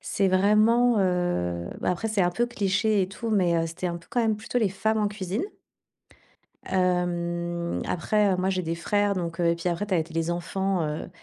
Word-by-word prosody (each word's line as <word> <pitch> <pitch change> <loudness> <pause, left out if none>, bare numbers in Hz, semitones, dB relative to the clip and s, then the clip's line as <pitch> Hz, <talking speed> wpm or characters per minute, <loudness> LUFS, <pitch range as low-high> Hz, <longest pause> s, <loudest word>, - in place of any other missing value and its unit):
c'est 200 - 0
vraiment, 215 +5 +4
heu, 175 - 0
bah - - +1
après, 180 +5 -2
c'est 215 -2 0
un 175 - +2
peu 240 +6 +1
cliché 205 -2 +1
et 185 - -2
tout, 225 +3 -5
mais, 180 -5 +3
heu, 165 - +1
c'était 165 +3 -4
un 170 -1 -3
peu 165 - -21
quand 245 - +1
même 225 -2 +2
plutôt 220 +3 -2
les 220 -4 +2
femmes 220 +3 0
en 210 - +2
cuisine. 200 - -3 1.2
Hem, 175 -2 -1
après, 205 +3 +1
heu, - - +1
moi, 185 +1 0
j'ai 185 -1 -1
des 165 -1 -2
frères, 205 +4 +1
donc, 170 -2 -3
heu 170 - +2
et 170 - +3
puis 170 +2 -2
après, 175 +5 -2
tu 195 - -1
avais 165 - +3
t 165 - -15
les 165 +1 0
enfants, 185 +2 -1
heu 150 +1 -4
185 Hz, 220 wpm, -26 LUFS, 170-210 Hz, 1.2 s, vraiment